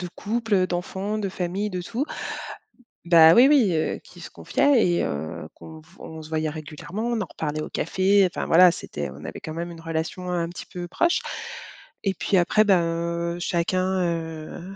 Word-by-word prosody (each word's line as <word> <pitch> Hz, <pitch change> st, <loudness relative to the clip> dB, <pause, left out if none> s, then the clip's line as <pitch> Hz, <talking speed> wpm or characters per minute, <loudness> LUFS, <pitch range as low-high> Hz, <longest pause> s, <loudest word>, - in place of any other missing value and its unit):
de 180 Hz, -, -4 dB
couple, 210 Hz, -4 st, 0 dB
d'enfants, 190 Hz, +4 st, -3 dB
de 200 Hz, -2 st, -2 dB
famille, 190 Hz, +3 st, -3 dB
de 180 Hz, -2 st, -4 dB
tout 235 Hz, +9 st, -2 dB, 1.0 s
bah, 165 Hz, -1 st, +8 dB
oui, 245 Hz, +8 st, +7 dB
oui, 250 Hz, -, +4 dB
heu, 155 Hz, -, -1 dB
qui -, -, -16 dB
se -, -, -8 dB
confiaient 275 Hz, -5 st, +2 dB
et 175 Hz, 0 st, +1 dB
heu, 80 Hz, +2 st, -4 dB
qu'on 160 Hz, -1 st, -12 dB, 0.2 s
on 160 Hz, 0 st, -9 dB
se 155 Hz, -, -11 dB
voyait 155 Hz, -1 st, -1 dB
régulièrement, 155 Hz, +8 st, -6 dB
on 240 Hz, -1 st, 0 dB
en -, -, -2 dB
reparlait 155 Hz, -1 st, -3 dB
au -, -, -5 dB
café, 190 Hz, +3 st, +2 dB
enfin, 180 Hz, -, -4 dB
voilà. 180 Hz, +2 st, +7 dB
C'était 75 Hz, -, -5 dB
on 70 Hz, +4 st, -11 dB
avait -, -, -6 dB
quand 155 Hz, -, -7 dB
même 170 Hz, +1 st, -4 dB
une 165 Hz, -1 st, -11 dB
relation 165 Hz, +2 st, -4 dB
un 175 Hz, -2 st, -1 dB
petit 175 Hz, -, -9 dB
peu 175 Hz, -1 st, -5 dB
proche, 340 Hz, -, +1 dB, 0.8 s
et 195 Hz, -, +1 dB
puis 190 Hz, -, +1 dB
après, 180 Hz, +4 st, +4 dB
ben, 190 Hz, -4 st, +4 dB, 0.5 s
heu, -, -, -7 dB
chacun, 185 Hz, +2 st, 0 dB
heu, 165 Hz, +2 st, -5 dB
175 Hz, 185 wpm, -24 LUFS, 160-195 Hz, 1.0 s, bah